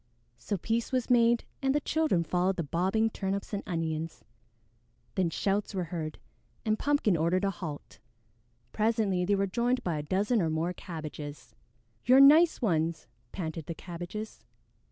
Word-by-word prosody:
So 195 - -2
peace 225 +6 -1
was 255 -1 0
made, 235 -1 +4 0.2
and 270 0 +1
the - - +4
children 300 - +1
followed 180 +3 +1
the 170 - -2
bobbing 190 +9 +1
Turnips 195 +1 -3
and 200 - -1
Onions. 165 -2 -3 0.9
Then 185 -3 +1
shouts 200 +4 -1
were 185 - 0
heard, 155 -2 -4 0.5
and 215 0 +1
Pumpkin 285 -10 +2
ordered 170 +4 +1
a 195 - +1
halt. 160 -5 -8 0.7
Presently 210 -5 +1
they 200 +2 +2
were 195 0 +1
joined 240 +6 0
by 165 -4 -1
a - - -4
dozen 205 +8 +1
or 165 - +1
more 160 +3 -1
Cabbages. 150 -7 -8 0.5
"You're 255 +2 +6
nice 305 +2 +7
ones!" 165 -5 0 0.3
panted 160 -4 -5
the 170 - -4
Cabbages. 175 +6 -7
190 Hz, 155 wpm, -29 LUFS, 165-225 Hz, 0.9 s, nice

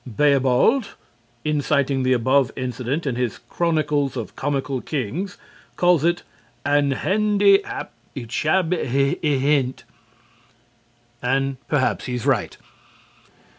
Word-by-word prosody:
Beobald, 140 - +2 0.5
in 150 -1 +1
citing 140 -2 +1
the 130 0 +1
above 130 +2 +2
incident 130 +4 -3
in 135 -4 -1
his 125 -3 -1
"Chronicles 150 -5 -1
of 115 - -6
Comical 135 -2 -2
Kings," 155 - -4 0.4
calls 175 -4 +3
it 175 +1 +1 0.4
"an 145 0 +3
hendy 200 +5 +3
hap - - -6 0.2
ichabbe 155 +8 0
y 140 +2 +1
hent." 135 -2 +1 1.4
And 135 +2 0
perhaps 140 -4 0
he's 125 -2 -4
right. - - 0
140 Hz, 105 wpm, -22 LUFS, 130-155 Hz, 1.4 s, calls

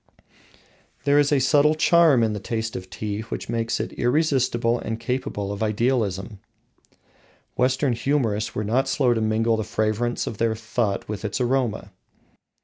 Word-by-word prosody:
There 145 0 +4
is 145 0 +2
a 145 - +4
subtle 145 +3 +3
charm 160 -5 +4
in 110 -1 +1
the 105 - -4
taste 110 +2 -3
of 95 0 -7
tea 100 +3 -4
which 110 - -6
makes 115 0 -1
it - - -4
irresistible 120 -4 +1
and 115 0 -4
capable 115 -4 -3
of 100 - -6
idealisation. 110 -3 -1 1.2
Western 130 +1 +1
humourists 115 -4 -1
were 105 - -1
not 120 +6 +1
slow 125 -4 +2
to 115 - -1
mingle 110 +1 +1
the 110 - -1
fragrance 110 +2 -1
of 105 - -6
their 115 -1 +1
thought 110 -2 -2
with 105 0 -5
its 105 +3 -2
aroma. 125 -5 -1
115 Hz, 155 wpm, -23 LUFS, 110-130 Hz, 1.2 s, There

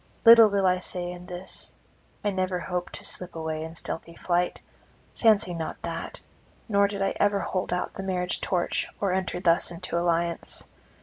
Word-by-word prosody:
Little 230 -1 +10
will 200 -1 +1
I 185 0 +3
say 175 -1 -4
in 180 0 -9
this. 180 0 -7 0.5
I 205 - +1
never 185 -1 -1
hoped 180 0 -3
to - - -4
slip 180 -1 -2
away 160 -1 -3
in 160 +1 -7
stealthy 170 0 -5
flight; 175 0 0 0.6
fancy 215 -5 +4
not 165 -2 -4
that; - - -5 0.5
nor 200 -2 +4
did 200 -1 -3
I 195 - +1
ever 205 -1 +2
hold 185 -2 -2
out 180 - -1
the - - -6
marriage 180 -2 -2
torch 175 -2 0
or 195 -3 +1
enter 185 -1 -1
thus 170 -2 +3
into 170 0 -3
alliance. 170 0 0
180 Hz, 175 wpm, -27 LUFS, 175-195 Hz, 0.6 s, Little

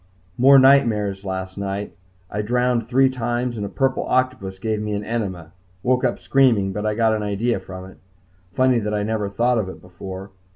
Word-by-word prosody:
More 135 +5 +7
nightmares 115 -8 +4
last 95 0 -5
night. 100 +1 -4 0.4
I 105 - -2
drowned 120 +1 0
three 130 +2 +4
times 120 -1 -2
and 105 - -4
a 100 - -4
purple 135 +2 0
octopus 130 -7 -1
gave 110 +1 -2
me 105 0 -3
an 105 0 -2
enema. 95 -8 -4 0.3
Woke 125 0 +1
up - - +1
screaming, 120 -8 +2
but 105 +2 -1
got 110 0 +2
an 110 - -1
idea 105 +2 -1
from 95 0 -9
it. 95 - -14 0.5
Funny 130 +3 +3
that 105 -1 -2
I 105 - -1
never 105 -1 -2
thought 120 +4 +1
of 95 -3 -3
it - - -10
before. 95 +2 -9
105 Hz, 190 wpm, -22 LUFS, 100-125 Hz, 0.5 s, More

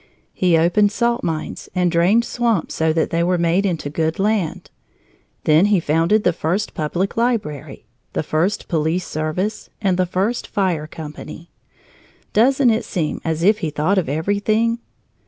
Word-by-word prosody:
He 180 -3 +3
opened 180 +5 +3
salt 235 +2 0
mines 160 -2 -4
and 180 -1 +2
drained 185 +8 +3
swamps 230 -7 -1
so 160 0 +1
that 160 0 0
they 170 - +1
were 180 +1 +2
made 170 +4 +2
into 165 -5 -2
good 160 +2 -1
land. 200 -4 -1 0.7
Then 155 +6 +4
he 205 -3 +3
founded 165 +7 +2
the 180 - +3
first 175 +6 -2
public 175 +5 -2
library, 225 - -2 0.3
the - - -1
first 175 +7 -1
police 165 +2 0
service, 155 +8 -3
and 190 -4 +1
the 185 -1 +1
first 195 +7 -1
fire 175 -6 -1
company. 155 +2 -9 0.8
Doesn't 255 +3 +4
it 220 - 0
seem 160 -5 -3
as 165 0 -2
if 210 +3 +4
he 165 - -2
thought 155 +7 +1
of 165 - -3
everything? 205 +8 0
180 Hz, 155 wpm, -20 LUFS, 160-210 Hz, 0.8 s, Then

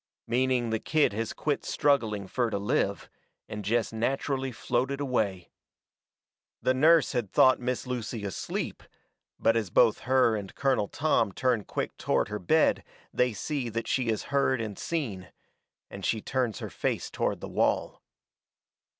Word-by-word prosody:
Meaning 125 0 +1
the 110 - 0
kid 155 -5 +2
has 115 +1 -2
quit 145 -2 -2
struggling 115 -9 +1
fur 120 +5 -1
to 110 - -2
live, 100 +1 0 0.4
and 105 -1 -6
jest 115 +3 0
natcherally 130 +3 -1
floated 130 +4 -1
away. 110 -10 -1 1.1
The 130 - +2
nurse 160 +5 +5
had 120 -7 -2
thought 130 0 +5
Miss 125 +1 -2
Lucy 120 -3 -4
asleep, 100 - -4 0.6
but 115 - +3
as 110 -5 0
both 110 - +4
her 130 -4 +4
and 100 -3 -6
Colonel 130 -7 +1
Tom 150 -7 +1
turn 120 -2 0
quick - - -3
toward - - 0
her 105 0 -3
bed 90 - +3 0.3
they 125 0 +2
see 130 +3 -3
that 115 +1 -3
she 130 -3 0
has 110 -2 0
heard 135 -2 +2
and 110 -3 -4
seen, 105 - -4 0.6
and 100 - -9
she 110 - +1
turns 125 -1 -1
her - - -6
face - - -2
toward - - -1
the - - -6
wall. - - 0
120 Hz, 155 wpm, -28 LUFS, 105-130 Hz, 1.1 s, nurse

